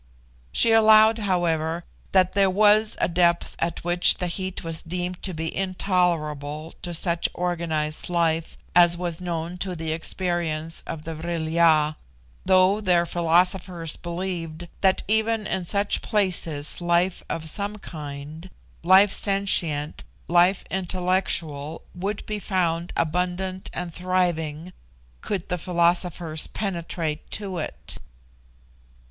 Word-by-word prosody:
She 230 Hz, -, +4 dB
allowed, 220 Hz, 0 st, +6 dB
however, 170 Hz, -4 st, 0 dB, 0.3 s
that 185 Hz, -1 st, +3 dB
there 195 Hz, -1 st, +4 dB
was 210 Hz, +2 st, +4 dB
a -, -, +2 dB
depth 170 Hz, 0 st, +1 dB
at 165 Hz, 0 st, -2 dB
which 175 Hz, +1 st, +4 dB
the 180 Hz, -, -3 dB
heat 185 Hz, +1 st, -4 dB
was 165 Hz, -1 st, -2 dB
deemed 180 Hz, +1 st, -4 dB
to 190 Hz, -, -3 dB
be 160 Hz, -1 st, -4 dB
intolerable 165 Hz, -5 st, -1 dB
to 175 Hz, -1 st, -4 dB
such 170 Hz, 0 st, 0 dB
organised 165 Hz, -4 st, -2 dB
life 165 Hz, -2 st, 0 dB, 0.2 s
as 175 Hz, -1 st, +6 dB
was 175 Hz, -1 st, -3 dB
known 175 Hz, 0 st, -4 dB
to 185 Hz, -1 st, -3 dB
the 160 Hz, -1 st, -3 dB
experience 165 Hz, -1 st, -2 dB
of 155 Hz, -2 st, -5 dB
the 165 Hz, -, -4 dB
Vril 165 Hz, 0 st, -3 dB
ya, 160 Hz, -2 st, +4 dB, 0.5 s
though 190 Hz, +2 st, +4 dB
their 175 Hz, -4 st, +3 dB
philosophers 175 Hz, 0 st, +1 dB
believed 170 Hz, -1 st, -5 dB
that 190 Hz, -1 st, +3 dB
even 220 Hz, +1 st, +2 dB
in 190 Hz, -3 st, -2 dB
such 200 Hz, +3 st, 0 dB
places 175 Hz, -8 st, -1 dB
life 175 Hz, +1 st, +1 dB
of 160 Hz, -1 st, -4 dB
some 205 Hz, +5 st, +2 dB
kind, 150 Hz, 0 st, -8 dB, 0.3 s
life 190 Hz, +3 st, +6 dB
sentient, 175 Hz, -7 st, +1 dB, 0.2 s
life 175 Hz, +2 st, +3 dB
intellectual, 180 Hz, -5 st, -1 dB
would 200 Hz, +3 st, -4 dB
be 210 Hz, -1 st, -3 dB
found 175 Hz, -4 st, -1 dB
abundant 180 Hz, +3 st, -1 dB
and 170 Hz, -2 st, -5 dB
thriving, 175 Hz, -2 st, -1 dB, 0.5 s
could 190 Hz, -4 st, -3 dB
the 180 Hz, -, -1 dB
philosophers 170 Hz, -2 st, 0 dB
penetrate 170 Hz, -5 st, -4 dB
to 195 Hz, -4 st, -4 dB
it. 155 Hz, -, -6 dB
175 Hz, 125 wpm, -24 LUFS, 165-185 Hz, 0.5 s, allowed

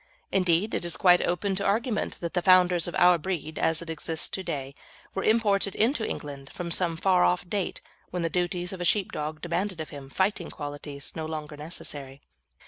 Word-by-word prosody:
Indeed, 185 Hz, +3 st, +2 dB
it -, -, -1 dB
is 170 Hz, -1 st, 0 dB
quite 180 Hz, -3 st, +6 dB
open 190 Hz, +2 st, 0 dB
to 200 Hz, -, 0 dB
argument 220 Hz, +3 st, 0 dB
that 170 Hz, -1 st, -3 dB
the 180 Hz, -, +1 dB
founders 180 Hz, -2 st, +5 dB
of 175 Hz, -, -4 dB
our 180 Hz, -1 st, +6 dB
breed, 160 Hz, -2 st, -3 dB
as 160 Hz, +1 st, +1 dB
it 165 Hz, -, -10 dB
exists 160 Hz, 0 st, -3 dB
to 190 Hz, -, -2 dB
day, 140 Hz, -6 st, -4 dB, 0.4 s
were 195 Hz, -, -2 dB
imported 205 Hz, -3 st, +3 dB
into 230 Hz, +2 st, +2 dB
England 140 Hz, -2 st, -6 dB
at 170 Hz, -1 st, -2 dB
some 170 Hz, -3 st, 0 dB
far 180 Hz, +1 st, +4 dB
off 180 Hz, 0 st, +2 dB
date 195 Hz, 0 st, -2 dB, 0.3 s
when 180 Hz, -1 st, -2 dB
the -, -, +2 dB
duties 180 Hz, +1 st, 0 dB
of 185 Hz, -, -6 dB
a -, -, 0 dB
sheepdog 155 Hz, -3 st, 0 dB
demanded 175 Hz, +1 st, -2 dB
of 160 Hz, -, -5 dB
him 140 Hz, -2 st, -9 dB
fighting 190 Hz, +2 st, 0 dB
qualities 145 Hz, -1 st, -6 dB
no 160 Hz, -1 st, -3 dB
longer 155 Hz, -1 st, -5 dB
necessary. 145 Hz, -3 st, -7 dB
175 Hz, 195 wpm, -27 LUFS, 155-190 Hz, 0.4 s, quite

